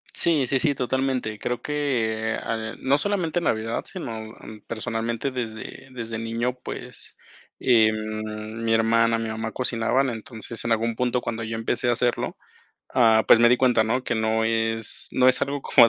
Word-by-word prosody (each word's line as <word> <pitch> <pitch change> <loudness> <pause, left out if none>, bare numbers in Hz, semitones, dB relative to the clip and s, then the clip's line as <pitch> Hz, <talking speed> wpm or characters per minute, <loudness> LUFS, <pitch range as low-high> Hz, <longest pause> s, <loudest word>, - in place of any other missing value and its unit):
Sí, 155 -6 +3
sí, 135 +1 +1
sí, 145 -4 +2
totalmente. 130 -4 -1
Creo 120 0 -3
que, 115 -7 0
eh, - - -3
ah, 110 0 -3
no 140 +2 +2
solamente 175 -3 0
Navidad, 115 -5 -1
sino, 115 - -5 0.3
am, 110 -1 -11
personalmente 115 +3 -2
desde 120 +1 -6
desde 115 -3 -5
niño, 115 +2 -1
pues, - - -8 0.4
em, 110 -1 +1
mi 115 0 +2
hermana, 115 0 +3
mi 115 0 -3
mamá 110 0 -3
cocinaban, 125 +2 +1
entonces, 115 0 -7
en 115 - 0
algún 115 +1 +1
punto 125 0 +1
cuando 115 0 -4
yo 110 0 -4
empecé 115 +2 0
a - - +4
hacerlo, 120 0 -1 0.6
ah, 110 -3 +5
pues - - +8
me 120 0 +6
di 125 - +4
cuenta, 125 -4 +4
¿no?, 125 +4 0
que 125 - -1
no 110 0 +1
es 115 0 -1
no 130 0 +4
es 125 0 +3
algo 140 0 -1
como 120 -4 +6
115 Hz, 175 wpm, -24 LUFS, 110-125 Hz, 0.6 s, pues